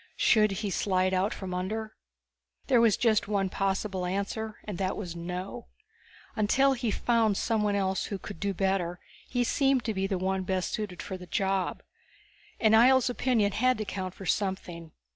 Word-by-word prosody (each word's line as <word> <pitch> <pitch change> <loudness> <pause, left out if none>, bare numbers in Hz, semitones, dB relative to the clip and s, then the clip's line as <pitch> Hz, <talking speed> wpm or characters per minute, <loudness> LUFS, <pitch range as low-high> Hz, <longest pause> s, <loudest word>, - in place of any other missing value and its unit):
Should 215 -2 +4 0.2
he 200 - -1
slide 185 -1 +1
out 190 +3 +1
from 185 -2 -5
under? 215 +4 -3 0.7
There 250 -4 +4
was 225 -3 +4
just 220 -4 +2
one 200 -2 0
possible 195 -1 -1
answer, 205 +3 -3
and 205 -5 -6
that 190 0 -1
was 180 -5 -5
no. 180 - -6 0.7
Until 270 +6 +3
he 240 -3 -2
found 225 -1 +2
someone 210 -3 +1
else 190 -1 0
who 200 - -4
could 170 - -9
do 200 0 0
better, 190 -2 -1 0.3
he 245 -1 +1
seemed 270 +1 +2
to 220 - -1
be 190 -1 -1
the 195 -1 -1
one 190 +1 -1
best 185 -1 -1
suited 205 -6 -4
for 190 - -5
the 180 -1 -11
job. 195 -1 -1 0.8
And 220 -1 +4
Ihjel's 250 +2 +6
opinion 235 -5 +1
had 255 +4 +2
to 215 - -3
count 185 -2 -5
for 195 - -9
something. 175 -4 -2
200 Hz, 175 wpm, -28 LUFS, 185-220 Hz, 0.8 s, Ihjel's